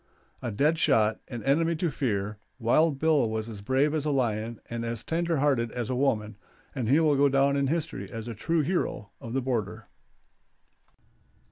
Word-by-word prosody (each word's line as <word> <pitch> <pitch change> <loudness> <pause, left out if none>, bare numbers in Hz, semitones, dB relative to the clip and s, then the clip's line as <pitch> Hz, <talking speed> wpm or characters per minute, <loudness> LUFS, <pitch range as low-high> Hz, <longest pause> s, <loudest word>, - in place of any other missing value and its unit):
A - - -3
dead 150 +9 +1
shot, 110 -9 +3
an 120 -3 -6
enemy 165 +5 +2
to 165 0 -1
fear, 105 -6 -2 0.2
Wild 140 +5 +3
Bill 150 -5 +3
was 110 0 -3
as 105 -3 -8
brave 135 +7 +1
as 155 -2 0
a 150 - -1
lion 115 -4 -1
and 115 0 -4
as 115 -1 -3
tender 165 0 0
hearted 135 -5 +1
as 120 0 -3
a - - 0
woman, 110 -6 0 0.4
and 125 -5 -2
he 145 +5 +5
will 155 -3 +3
go 140 +1 +4
down 140 +1 +3
in 140 -1 +1
history 165 +2 -3
as 115 -1 -6
a 120 - -4
true 165 +9 0
hero 145 - -2
of 115 - -7
the 135 -1 0
border. 110 -4 -3
130 Hz, 190 wpm, -27 LUFS, 115-150 Hz, 0.4 s, he